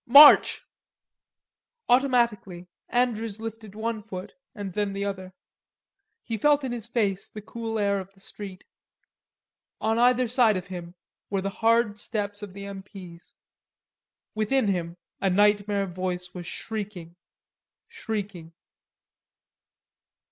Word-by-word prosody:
"March!" 285 +4 +9 1.2
Automatically, 235 -8 +2 0.2
Andrews 230 -4 0
lifted 225 -2 -7
one 220 0 -2
foot 185 -2 -8 0.2
and 200 -3 -5
then 205 0 -1
the 200 0 -2
other. 190 -2 -5 0.9
He 225 -2 -4
felt 295 +3 +4
in 260 - -2
his 235 -2 -4
face 205 -5 0
the 215 - -8
cool 225 0 -4
air 200 -1 +1
of 190 0 -9
the - - -21
street. 195 -1 -9 1.2
On 220 +1 +1
either 250 +1 +4
side 230 -4 +4
of 185 - -5
him 175 -1 -8 0.3
were 195 -2 0
the 195 +1 -2
hard 225 -1 +2
steps 205 -2 -3
of 205 -3 -8
the 200 +1 -7
M. 200 -1 -7
P.'s. 185 -3 -12 1.0
Within 215 +1 +1
him 175 -2 -2 0.2
a 195 - +2
nightmare 205 +1 +3
voice 180 0 -4
was 175 -2 -7
shrieking, 200 -6 -6 0.7
shrieking. 205 - -5
205 Hz, 125 wpm, -26 LUFS, 190-225 Hz, 1.2 s, March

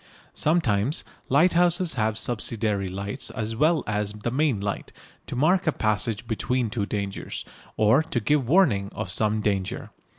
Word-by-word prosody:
Sometimes 145 -6 +1 0.3
lighthouses 175 +3 +3
have 110 -3 0
subsidiary 105 -4 0
lights 100 +6 -4
as 110 -2 -4
well 155 +6 +2
as 105 0 -1
the 105 +3 -4
main 135 -4 +1
light, 100 0 -4 0.4
to - - -5
mark 175 +8 +2
a - - +5
passage 110 -2 0
between 120 +1 -1
two 105 -4 -2
dangers, 100 -2 -4 0.3
or 110 +7 +5
to 160 -5 -2
give 135 +1 +1
warning 130 - +3
of 90 - -4
some 105 +2 0
danger. 100 -3 -2
115 Hz, 145 wpm, -25 LUFS, 105-150 Hz, 0.4 s, a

